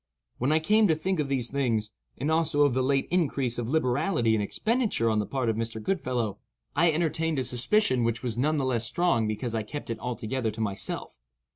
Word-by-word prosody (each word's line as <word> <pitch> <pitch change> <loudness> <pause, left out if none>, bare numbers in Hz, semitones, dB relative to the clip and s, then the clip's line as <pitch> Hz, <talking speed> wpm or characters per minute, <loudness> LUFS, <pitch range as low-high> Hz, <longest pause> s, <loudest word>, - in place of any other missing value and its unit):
When 130 +4 +1
I 155 - +4
came 210 +7 +4
to 160 - +3
think 185 +3 -1
of 145 -2 -1
these 130 -4 -1
things, 115 -6 0 0.3
and 145 +5 -1
also 160 -2 +3
of 140 - +2
the 130 - +1
late 135 +1 +1
increase 140 -9 +1
of 120 -1 -3
liberality 130 - +1
and 110 - +2
expenditure 215 - 0
on 110 - +1
the 105 - -1
part 130 -3 -1
of 110 - +1
Mr. 115 0 -3
Goodfellow, 125 - -2 0.4
I 165 +3 +4
entertained 165 0 0
a 130 - +1
suspicion 125 - +1
which 115 +1 -1
was 120 -3 -2
none 150 +6 +1
the 135 - 0
less 120 -3 0
strong 170 -7 +1
because 110 +2 -3
I 110 - 0
kept 115 +4 -6
it 115 - -4
altogether 125 0 -2
to 110 +1 -7
myself. 100 - -3
130 Hz, 215 wpm, -27 LUFS, 115-155 Hz, 0.4 s, I